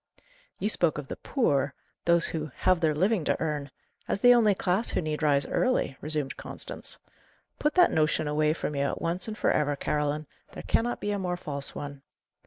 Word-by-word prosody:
"You - - -1
spoke 170 -7 +2
of 145 -3 -6
'the - - -5
poor' 145 - 0 0.3
those 170 0 +4
who 155 -2 -1
'have 185 -2 +2
their 155 -3 +2
living 190 +3 +2
to - - +1
earn' 150 -3 -2 0.4
as - - -1
the 245 0 +8
only 220 -4 +4
class 185 +5 +1
who - - 0
need 155 -2 -3
rise 145 -2 +3
early," 255 - 0
resumed 150 -2 -3
Constance. - - -4 0.6
"Put 300 - +1
that 360 -1 +6
notion 155 0 +1
away 150 +1 +2
from 155 - -4
you 140 - -1
at - - -2
once 175 +4 -2
and 215 -1 -5
for - - +2
ever, 145 -1 +1
Caroline; 150 +1 -1 0.3
there - - -8
cannot 240 +1 0
be 205 - -1
a 205 - -1
more 180 -2 -2
false 140 -4 -3
one. 145 -1 -6
155 Hz, 195 wpm, -28 LUFS, 150-200 Hz, 0.6 s, the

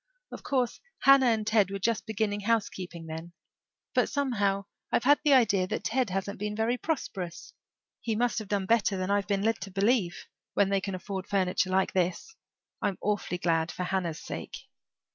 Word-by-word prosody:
Of - - -8
course 255 -4 0 0.2
Hannah 275 -1 +7
and 220 -2 +2
Ted 215 -3 +3
were 200 - -3
just 225 +3 -1
beginning 215 -1 -1
housekeeping 195 -6 -2
then. 160 +2 -7 0.6
But - - +2
somehow 205 -8 0 0.3
I've - - +2
had 290 +3 +5
the 295 -3 +5
idea 200 -8 +4
that - - -3
Ted 250 0 0
hasn't 195 +2 -3
been 210 0 -3
very 225 +3 +1
prosperous. 195 - -4 0.5
He 225 -2 -2
must 240 +1 +1
have 215 - -7
done 200 -1 0
better 215 -2 +2
than 185 +1 -1
I've 200 0 +1
been 200 -1 0
led 225 -1 +1
to 195 - -5
believe, 195 -2 +1 0.3
when 200 -1 +3
they 195 -1 +1
can 195 -1 -3
afford 190 +1 -5
furniture 185 -2 +1
like 190 +1 +1
this. 185 - -1 0.5
I'm 195 - 0
awfully 205 -3 -1
glad 165 -2 +1
for 180 - -4
Hannah's 180 -3 -1
sake." - - -6
200 Hz, 180 wpm, -29 LUFS, 185-225 Hz, 0.6 s, Hannah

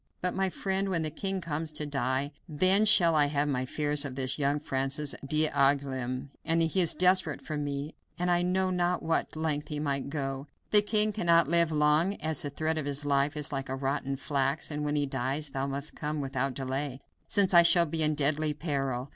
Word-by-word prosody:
But 180 0 -1
my 190 0 0
friend, 195 +1 -2
when 170 -4 0
the 155 - -3
king 190 +4 -3
comes 160 -1 -3
to 150 0 -2
die 140 0 -1 0.2
then 185 +7 +4
shall 175 -5 +7
I 150 -2 +4
have 145 0 0
my 130 -2 -2
fears 150 +1 0
of 135 -3 -6
this 130 +1 -1
young 145 +1 +1
Francis 135 +1 -2
d'Angouleme. 140 -3 0
He 165 +3 +1
is 170 - +3
desperate 185 +1 +2
for 155 - -6
me, 145 +1 -4 0.2
and 180 0 0
I 175 0 +2
know 185 +1 0
not 180 0 0
to - - -10
what 165 0 -1
length 155 -2 -2
he 150 -1 -4
might 140 -2 -2
go. 135 -1 -4 0.2
The 210 - +8
king 210 0 +3
cannot 170 -6 +3
live 170 0 +3
long, 155 +5 +2
as 155 -4 -1
the 145 - -4
thread 155 +2 -2
of 145 - -4
his 145 +1 -2
life 140 +1 +1
is 150 -1 -3
like 135 -2 -4
rotten 135 +1 -2
flax, 140 +2 -2
and 150 0 -3
when 150 0 -1
he 145 -1 +1
dies 140 +2 -3
thou 135 0 -3
must 140 +2 -6
come 150 0 -4
without 135 -1 -2
delay, 135 0 -3 0.3
since 200 -2 +2
I 170 - +9
shall 170 0 +5
be 160 0 -3
in 155 0 +2
deadly 150 +1 0
peril. 135 -4 -3
150 Hz, 205 wpm, -28 LUFS, 140-165 Hz, 0.3 s, I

